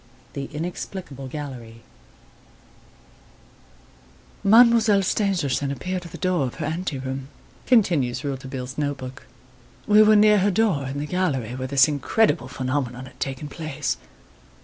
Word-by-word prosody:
The 140 -1 -4
Inexplicable 155 -2 -6
Gallery 125 -5 -8 2.6
"Mademoiselle 220 -1 +6
Stangerson 175 - 0
appeared 180 +5 -4
at 170 - -10
the - - -8
door 180 -7 0
of 125 - -8
her 155 - -4
ante 160 -1 -3
room," 130 0 -5 0.4
continues 170 - +2
Rouletabille's 130 -1 -5
note 145 -1 -1
book. 130 0 -9 0.6
"We 210 +1 +6
were 215 0 +6
near 210 0 +6
her 195 +2 +2
door 185 -9 +1
in 135 +2 -5
the 145 - -2
gallery 150 -9 -1
where 130 +1 -4
this 135 +1 +5
incredible 145 - +1
phenomenon 130 -1 -3
had 130 - -16
taken 135 +2 -4
place. 155 -1 -3
145 Hz, 130 wpm, -23 LUFS, 130-185 Hz, 2.6 s, Mademoiselle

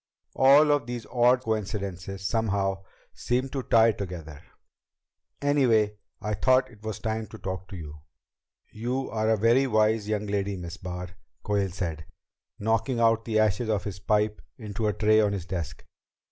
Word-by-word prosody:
All 140 +3 +6
of 145 -5 +1
these 120 -2 -5
odd 125 +1 +4
coincidences, 100 -3 -3
somehow, 100 -4 0 0.3
seem 125 +2 -1
to 135 0 -3
tie 115 -2 +5
together. 85 -7 -7 1.0
Anyway, 115 -8 +3 0.2
I 105 +1 -3
thought 130 +5 +3
it 105 -3 -18
was 110 -2 -4
time 110 -1 -3
to 110 - -11
talk 95 -2 -5
to - - -9
you." 75 -2 -9 0.7
"You 125 +4 -3
are 110 0 0
a 110 - +3
very 120 +6 +4
wise 110 -2 +2
young 105 -1 -1
lady, 100 -1 -1
Miss 85 0 -7
Barr," 90 -1 -6 0.3
Quayle 100 -2 0
said, 85 -4 -4 0.5
knocking 115 +4 0
out 115 -1 +3
the 110 -2 0
ashes 110 +2 +2
of 105 -2 0
his 95 -2 -6
pipe 105 +1 +1 0.2
into 110 -1 -3
a 105 - +1
tray 110 +1 +4
on 105 -1 +1
his 95 -4 -4
desk. 85 -5 -5
105 Hz, 160 wpm, -27 LUFS, 95-115 Hz, 1.0 s, All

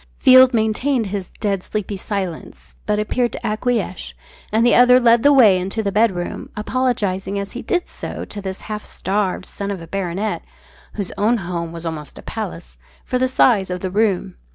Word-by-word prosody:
Field 255 0 +7
maintained 230 +2 +1
his 195 -2 -4
"dead 200 -3 -2
sleepy" 210 +1 -4
silence, 175 - -5
but 210 - +1
appeared 240 +3 0
to - - -7
acquiesce, 215 -3 -2 0.4
and 220 +2 +3
the 240 - +5
other 250 +1 +7
led 235 -1 +5
the 285 - +5
way 220 -9 +6
into 195 +5 -3
the 200 - -1
bedroom, 195 -4 0
apologising 210 -5 -1
as 200 0 -4
he 245 - -6
did 355 -1 -1
so - - -7
to 205 - -7
this 190 -1 -5
half 210 0 -6
starved 190 -1 -2
son 200 0 -5
of 200 -2 -3
a 165 - -9
baronet 195 +3 -3 0.5
whose 200 -4 -4
own 225 +4 +3
home 175 -4 -4
was 170 0 -8
almost 155 -3 -6
a - - -11
palace - - -7 0.3
for 250 - -1
the 260 - +2
size 230 -7 +3
of 180 0 -4
the 185 - -3
room. 195 - 0
205 Hz, 185 wpm, -20 LUFS, 185-230 Hz, 0.5 s, Field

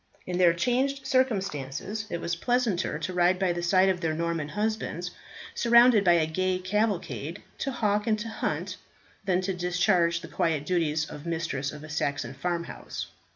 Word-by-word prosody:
In 180 0 -2
their 175 -2 +6
changed 265 +8 0
circumstances 210 - -1
it 170 - -3
was 170 0 -2
pleasanter 230 -5 0
to 160 +4 -4
ride 180 +1 +3
by 185 -2 +1
the 175 - -3
side 185 +2 +4
of 185 -2 +1
their 160 -2 0
Norman 165 -2 -2
husbands, 210 -3 -2 0.4
surrounded 235 -2 +6
by 175 -2 +5
a 165 -2 +3
gay 185 +3 0
cavalcade, 200 +1 -2 0.2
to 275 - -1
hawk 210 -4 0
and 215 -1 +3
to 215 +2 -5
hunt, 220 - -3 0.5
than 185 -1 +2
to 190 +1 -1
discharge 175 -1 +2
the - - -8
quiet 155 -3 0
duties 160 -2 +1
of 150 +3 -9
mistress 160 -5 -2
of 150 0 -10
a 155 - -10
Saxon 145 -3 -2
farm 170 +5 -2
house. - - -7
180 Hz, 175 wpm, -27 LUFS, 170-210 Hz, 0.5 s, their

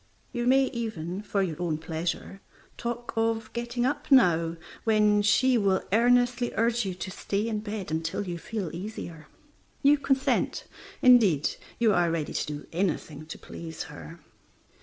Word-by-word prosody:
You 240 -1 -2
may 265 +1 +5
even 200 - -4
(for 205 -1 0
your 170 -2 -4
own 165 -3 0
pleasure) 165 +4 -4 0.3
talk 240 0 -4
of 225 0 0
getting 240 +1 -2
up 290 +2 -2
now, 170 -10 +4 0.3
when 210 -2 +4
she 245 +4 +4
will 195 -2 +2
earnestly 245 +1 +3
urge 230 -1 +1
you 185 - -3
to 185 +1 -6
stay 200 +3 -2
in 220 -2 -1
bed 210 -5 -5
until 160 +5 -2
you 175 -1 -4
feel 195 -3 -4
easier. 170 -5 -7 0.6
You 285 +1 +5
consent; 270 -2 0 0.4
indeed, 215 - +5 0.3
you 225 -3 +3
are 175 -2 +3
ready 165 -2 -2
to - - -2
do 150 -1 -6
anything 160 -4 -2
to 160 - -7
please 165 -1 -7
her. 165 +3 -10
205 Hz, 155 wpm, -27 LUFS, 170-240 Hz, 0.6 s, may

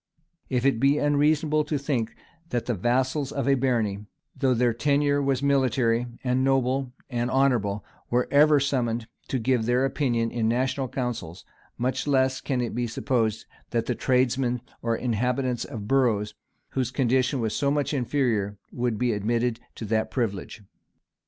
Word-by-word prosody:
] 170 - -50
If 125 -1 0
it 135 -5 +3
be 140 +3 +4
unreasonable 150 +1 +2
to 150 - -1
think 125 -5 -2 0.3
that 120 -1 -1
the 120 - 0
vassals 130 - 0
of 140 -1 -2
a 140 - +5
barony, 115 -6 0 0.3
though 130 -2 +2
their 120 0 +2
tenure 145 +3 +2
was 135 -1 0
military, 130 -4 +2 0.2
and 130 0 +1
noble, 135 -1 +1 0.2
and 120 -1 -2
honorable, 120 -7 +1 0.2
were 125 +1 +1
ever 150 +1 +6
summoned 120 -5 -1 0.2
to 135 - -1
give 120 -1 +1
their 125 +2 +3
opinion 120 -4 0
in 115 -2 0
national 130 +3 0
councils, 115 -10 -4 0.3
much 130 +4 -1
less 130 -2 +2
can 130 -3 -1
it 120 - -3
be 120 0 -1
supposed 115 -2 -1 0.2
that 115 -2 0
the 125 - 0
tradesmen 125 0 +1 0.2
or 115 -1 0
inhabitants 125 +1 -1
of 105 -3 -7
boroughs, 115 -6 +2 0.4
whose 130 -3 -1
condition 130 +1 +1
was 110 -2 -1
so 140 - +1
much 145 +1 0
inferior, 120 -7 0
would 120 -3 -1
be 120 0 +1
admitted 115 +3 0 0.2
to 115 - -6
that 110 +1 0
privilege. 105 -3 -3
125 Hz, 160 wpm, -26 LUFS, 115-135 Hz, 0.4 s, ever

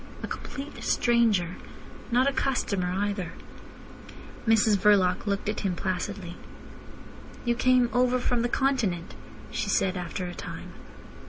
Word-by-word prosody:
A - - -2
complete 285 +1 -7
stranger. 220 -8 +2 0.5
Not 250 +3 +4
a 280 - +2
customer 200 -10 0
either. 200 -2 -2 1.1
Mrs 220 -1 +5
Verloc 195 -1 +3
looked 200 0 -1
at 210 - -1
him 190 -3 -1
placidly. 185 0 -3 1.1
"You 240 - +3
came 250 0 +4
over 250 0 +3
from 245 -1 0
the 240 - 0
Continent?" 235 -11 0 0.4
she - - -2
said 190 0 +2
after 180 +1 -4
a 175 - -5
time. - - -8
205 Hz, 130 wpm, -27 LUFS, 185-245 Hz, 1.1 s, Mrs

